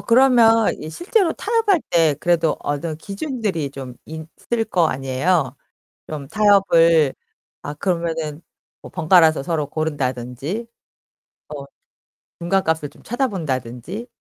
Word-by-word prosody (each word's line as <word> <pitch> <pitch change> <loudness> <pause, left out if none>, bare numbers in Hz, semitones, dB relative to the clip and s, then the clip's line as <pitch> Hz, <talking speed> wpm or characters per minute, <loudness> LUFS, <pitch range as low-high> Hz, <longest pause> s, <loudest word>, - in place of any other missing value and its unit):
그러면 230 -3 +4
이 155 - -6
실제로 355 - +1
타협할 425 -4 +1
때 165 -4 +3
그래도 170 -2 +2
어느 150 +2 -3
기준들이 200 - -3
좀 135 -3 -8
있을 160 +9 -4
거 175 -5 +3
아니에요? 135 +1 0 0.5
좀 145 -3 -7
타협을 170 -8 +4 0.5
아, 145 - -5
그러면은 165 -2 -2 0.4
뭐 - - -11
번갈아서 160 -3 +4
서로 155 -2 -1
고른다든지 140 - -3 0.8
뭐 145 -2 -7 0.7
중간값을 165 -4 0
좀 145 - -21
찾아본다든지 180 - -3
165 Hz, 260 characters per minute, -21 LUFS, 145-210 Hz, 0.8 s, 그러면